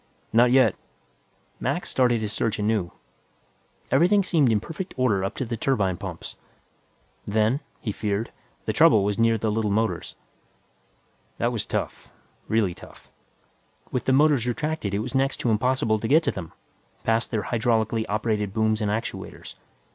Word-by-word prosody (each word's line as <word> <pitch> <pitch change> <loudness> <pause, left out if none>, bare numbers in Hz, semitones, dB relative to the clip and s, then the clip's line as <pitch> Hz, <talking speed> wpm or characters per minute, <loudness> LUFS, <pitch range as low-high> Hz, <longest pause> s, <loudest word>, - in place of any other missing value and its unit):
"Not 120 +2 +5
yet." 125 -4 +5 0.9
Mac - - -1
started 120 -3 +2
his 105 -1 -3
search 110 -2 -1
anew. 105 -4 0 1.0
Everything 195 +4 +4
seemed 155 -9 +3
in 110 - +3
perfect 165 - -7
order 110 -7 +2
up 95 - -3
to 130 - -3
the 115 0 -3
turbine 105 -6 0
pumps. 95 -3 -8 0.9
Then, 110 +5 +2 0.2
he 110 - -3
feared, 105 +2 -2 0.3
the - - -1
trouble 105 - +5
was 105 +2 -1
near 115 0 +3
the 110 0 -1
little 110 0 0
motors. 110 +2 -1 1.2
That - - 0
was - - -2
tough, - - -4 0.4
really 105 -5 +1
tough. - - -15 0.8
With 125 - -2
the - - +2
motors 140 -3 +4
retracted 135 -5 -2
it 105 - -1
was 125 - -6
next 135 0 +1
to 120 - +1
impossible 110 -1 +1
to 110 - -3
get 155 +6 +5
to 140 - +1
them, 85 -4 -7 0.5
past 115 +1 +1
their 110 -4 -1
hydraulically 110 -1 0
operated 105 -1 -1
booms 110 0 +1
and 105 - 0
actuators. 110 +3 -5
110 Hz, 155 wpm, -25 LUFS, 105-125 Hz, 1.2 s, Not